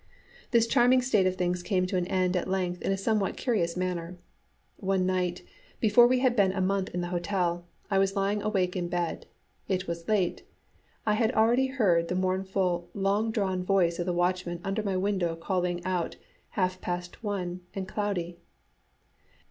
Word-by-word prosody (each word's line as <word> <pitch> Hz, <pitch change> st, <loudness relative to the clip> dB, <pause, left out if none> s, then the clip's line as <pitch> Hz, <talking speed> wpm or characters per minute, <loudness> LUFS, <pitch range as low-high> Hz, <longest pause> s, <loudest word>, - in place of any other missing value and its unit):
This 235 Hz, -2 st, +4 dB
charming 245 Hz, +2 st, +4 dB
state 215 Hz, -7 st, +3 dB
of 185 Hz, -, 0 dB
things 180 Hz, -1 st, -1 dB
came 185 Hz, -1 st, +1 dB
to 185 Hz, -, -3 dB
an 180 Hz, -1 st, 0 dB
end 185 Hz, -1 st, +1 dB
at 180 Hz, -, -1 dB
length 180 Hz, -2 st, -1 dB
in -, -, 0 dB
a 195 Hz, -, +1 dB
somewhat 200 Hz, 0 st, 0 dB
curious 180 Hz, -9 st, 0 dB
manner. 180 Hz, -1 st, -3 dB, 0.6 s
One 190 Hz, -1 st, 0 dB
night, 180 Hz, -1 st, -1 dB, 0.4 s
before 235 Hz, +2 st, +6 dB
we 250 Hz, 0 st, +2 dB
had 255 Hz, -2 st, +3 dB
been 200 Hz, -4 st, +4 dB
a 195 Hz, -, -2 dB
month 190 Hz, 0 st, 0 dB
in 180 Hz, -, -1 dB
the 175 Hz, -, -3 dB
hotel, 175 Hz, -1 st, -1 dB, 0.2 s
I 195 Hz, -, +3 dB
was 195 Hz, 0 st, +1 dB
lying 200 Hz, +1 st, +1 dB
wide 205 Hz, -, -6 dB
awake 185 Hz, -4 st, 0 dB
in 175 Hz, -2 st, -1 dB
bed. 175 Hz, -1 st, -3 dB, 0.4 s
It 185 Hz, -1 st, -1 dB
was 170 Hz, 0 st, -5 dB
late; 200 Hz, -5 st, +1 dB, 0.6 s
I 210 Hz, -, +3 dB
had 220 Hz, +1 st, +2 dB
already 240 Hz, +4 st, +3 dB
heard 190 Hz, -11 st, +2 dB
the 180 Hz, -, -2 dB
mournful, 185 Hz, -1 st, 0 dB
long 200 Hz, +3 st, +1 dB
drawn 190 Hz, -5 st, -1 dB
voice 180 Hz, -3 st, +2 dB
of 175 Hz, -, -2 dB
the -, -, +2 dB
watchman 175 Hz, 0 st, 0 dB
under 195 Hz, +3 st, -1 dB
my 195 Hz, -3 st, -1 dB
window 185 Hz, -3 st, 0 dB
calling 175 Hz, 0 st, -2 dB
out, 180 Hz, -2 st, -1 dB, 0.4 s
"Half 185 Hz, -1 st, 0 dB
past 180 Hz, +3 st, -5 dB
one 185 Hz, -4 st, -3 dB
and 190 Hz, -1 st, -3 dB
cloudy." 180 Hz, -5 st, -3 dB
185 Hz, 180 wpm, -28 LUFS, 180-205 Hz, 0.6 s, before